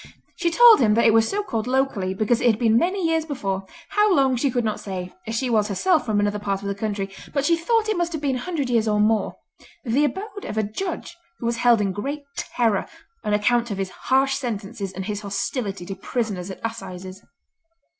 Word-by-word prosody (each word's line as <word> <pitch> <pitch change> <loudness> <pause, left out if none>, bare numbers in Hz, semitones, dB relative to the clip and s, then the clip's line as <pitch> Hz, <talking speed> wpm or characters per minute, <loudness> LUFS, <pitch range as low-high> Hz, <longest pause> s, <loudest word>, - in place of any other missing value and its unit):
She 345 -2 0
told 465 +6 +8
him 215 -5 +4
that 235 - +3
it 225 - +6
was 225 0 +4
so 410 +1 -1
called 225 - -3
locally 250 -8 0
because 220 +4 +1
it 250 - +3
had 220 -3 +4
been 225 -2 +3
many 360 +6 +2
years 325 -1 +1
before—how 280 - -1
long 270 -3 +3
she 270 +3 +1
could 245 -1 0
not 215 - -1
say, 185 -2 -6
as 225 - -3
she 255 +3 0
was 215 -3 +2
herself 310 - +1
from 210 -2 +1
another 205 0 0
part 200 -1 -2
of - - -4
the 200 - -1
country, 200 -1 -3 0.3
but 280 -1 +1
she 335 - +4
thought 440 +7 +1
it 430 - +1
must 345 -1 -1
have 315 - -3
been 270 -3 +1
a - - -5
hundred 305 -2 -2
years 230 -2 +1
or 210 -1 +2
more—the 225 +5 -1
abode 400 +6 -3
of 215 - -5
a 220 - +2
judge 340 - -4 0.2
who - - -7
was 235 0 0
held 240 -1 +4
in 195 -2 0
great 280 +10 -4
terror 225 -5 0 0.4
on 210 - +1
account 235 +3 +2
of 200 - -3
his 190 -1 -3
harsh 270 +1 +1
sentences 210 -5 -4
and 190 0 -6
his 210 0 -3
hostility 200 -1 -3
to 195 - -5
prisoners 195 -2 -3
at 190 - -7
Assizes. 185 -4 -7
230 Hz, 220 wpm, -23 LUFS, 205-280 Hz, 0.4 s, told